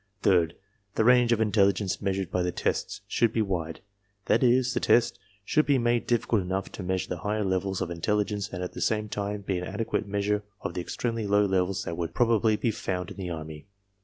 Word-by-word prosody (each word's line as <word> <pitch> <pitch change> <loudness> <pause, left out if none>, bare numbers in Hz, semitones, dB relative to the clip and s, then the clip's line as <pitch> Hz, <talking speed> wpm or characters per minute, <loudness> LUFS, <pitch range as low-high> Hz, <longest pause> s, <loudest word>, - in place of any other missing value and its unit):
Third, 85 -4 +3 0.4
the - - +2
range 125 0 +5
of 115 - +3
in 110 -2 +1
telligence 100 -1 +2
measured 95 -3 -1
by 90 - +1
the 90 0 0
tests - - -2
should 115 -1 +2
be 115 -1 +1
wide; 85 -5 -3 0.4
that - - +3
is, 125 0 +3
the. - - 0
test 120 - +3 0.3
should 155 - +2
be 140 -2 +4
made 120 -1 +1
difficult 115 -2 +2
enough 95 +1 -3
to - - -7
measure 95 0 -2
the 90 - -3
higher 105 +4 -1
levels 95 0 -1
of 85 - -2
intelligence 105 +3 -1
and 90 -1 -4
at 90 - -5
the - - -7
same 105 -1 0
time 105 0 -3
be 95 -2 -2
an - - -5
adequate 105 +2 -2
measure 100 +1 0 0.2
of 85 - -4
the 90 - -3
extremely 115 +4 -3
low 100 +1 +4
levels 95 0 0
that 85 -3 -5
would 85 -2 -4
probably 115 -2 +3
be 115 +2 0
found 90 -3 -4
in - - -10
the 95 -2 -4
Army. 80 0 -7
100 Hz, 220 wpm, -27 LUFS, 90-110 Hz, 0.4 s, range